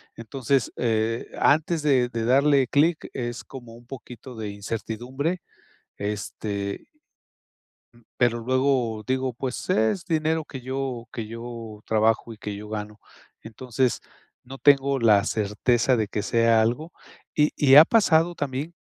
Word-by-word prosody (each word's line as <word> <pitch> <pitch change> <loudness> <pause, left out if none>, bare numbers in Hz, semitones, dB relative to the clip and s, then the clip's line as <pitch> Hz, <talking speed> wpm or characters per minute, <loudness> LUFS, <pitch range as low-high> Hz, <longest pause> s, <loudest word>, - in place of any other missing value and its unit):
Entonces, 125 +2 -1
eh, 115 0 0
antes 160 +2 +2
de 130 -5 +2
de 115 -2 -3
darle 135 +1 +4
clic, 155 +4 +1
es 120 -1 -4
como 120 -4 -11
un 120 0 -17
poquito 125 -1 -10
de 110 -2 -5
incertidumbre 120 - -4 0.6
este 100 -1 -4 1.3
pero 120 -1 +2
luego 125 -3 0
digo: 130 -1 -1
"Pues, 125 +1 -5
es 110 - +1
dinero 160 -1 0
que 130 -3 -9
yo 130 -2 -4
que 110 -3 -5
yo 115 -2 -8
trabajo 110 +1 +1
y - - -15
que 105 -1 -6
yo 105 +1 -9
gano", 105 0 -6 0.4
entonces 125 +2 -2 0.4
no 135 +2 -10
tengo 140 -1 +4
la 105 -3 +5
certeza 115 +4 +1
de 110 -2 0
que 105 - -3
sea 115 +1 +3
algo. 145 +10 -1 0.4
Y 150 0 +3
y 135 -2 +5
ha 150 - +12
pasado 175 -6 +3
también, 145 +3 -4
120 Hz, 135 wpm, -24 LUFS, 110-135 Hz, 1.3 s, ha